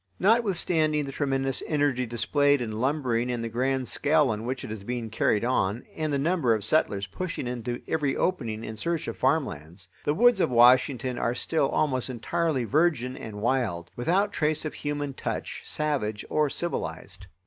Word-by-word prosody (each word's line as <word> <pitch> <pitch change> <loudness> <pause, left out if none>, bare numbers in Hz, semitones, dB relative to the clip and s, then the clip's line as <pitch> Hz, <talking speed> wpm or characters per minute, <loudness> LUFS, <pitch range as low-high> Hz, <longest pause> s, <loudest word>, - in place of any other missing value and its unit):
Notwithstanding 180 -8 +2
the 135 - -6
tremendous 135 -2 0
energy 145 -5 +1
displayed 145 +5 +2
in 120 -3 -3
lumbering 125 0 0
and 120 -1 -3
the 115 - -3
grand 130 +2 0
scale 150 -1 +2
on 110 +2 -4
which 130 +1 -3
it - - -7
is 110 -3 -6
being 120 0 -4
carried 110 0 +1
on, 115 -3 0
and 155 -1 -2
the 140 - +1
number 145 -5 +2
of 105 - -3
settlers 105 -5 +1
pushing 170 - -5
into 120 0 -4
every 150 -4 0
opening 115 -12 -1
in 110 - -6
search 165 +8 -2
of - - -4
farmlands, 95 - -1
the 145 - +1
woods 240 +1 +5
of - - +2
Washington 125 +1 +4
are 120 +1 0
still 150 +1 0
almost 130 -4 0
entirely 140 +3 -1
virgin 130 -2 +1
and 105 -4 -8
wild, 110 -10 0
without 190 +11 +1
trace 155 +1 0
of 155 - -3
human 145 -1 -3
touch, - - -4
savage 135 -9 -2
or 150 -1 +2
civilized. 95 - -4
130 Hz, 170 wpm, -27 LUFS, 115-155 Hz, -, woods